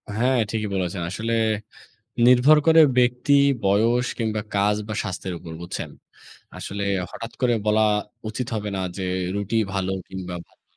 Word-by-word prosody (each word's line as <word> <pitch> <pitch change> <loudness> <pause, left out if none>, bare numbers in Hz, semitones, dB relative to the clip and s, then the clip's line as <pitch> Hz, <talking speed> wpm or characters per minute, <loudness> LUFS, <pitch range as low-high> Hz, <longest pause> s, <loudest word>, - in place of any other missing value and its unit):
হ্যাঁ, 125 +3 +2
ঠিকই 110 -2 -2
বলেছেন। 90 -1 -2
আসলে 115 +4 -3 0.9
নির্ভর 125 +5 +6
করে 160 0 +7 0.2
ব্যক্তি, 125 +3 +2 0.3
বয়স 115 +5 +3
কিংবা 110 -2 -1 0.2
কাজ 105 +1 +2
বা 110 - -3
স্বাস্থ্যের 95 -2 -5
উপর, 80 -1 -10
বুঝছেন? 85 - -5 0.7
আসলে 100 0 -4 0.3
হঠাৎ 115 0 -8
করে 120 -2 +3
বলা 110 +1 +3 0.5
উচিত 115 +3 -4
হবে 105 -1 -3
না - - -2 0.2
যে, 95 - -3 0.3
রুটি 100 +2 -2 0.2
ভালো 95 -1 -1 0.2
কিংবা 90 -1 -6
ভালো - - -33
105 Hz, 145 wpm, -23 LUFS, 95-120 Hz, 0.9 s, করে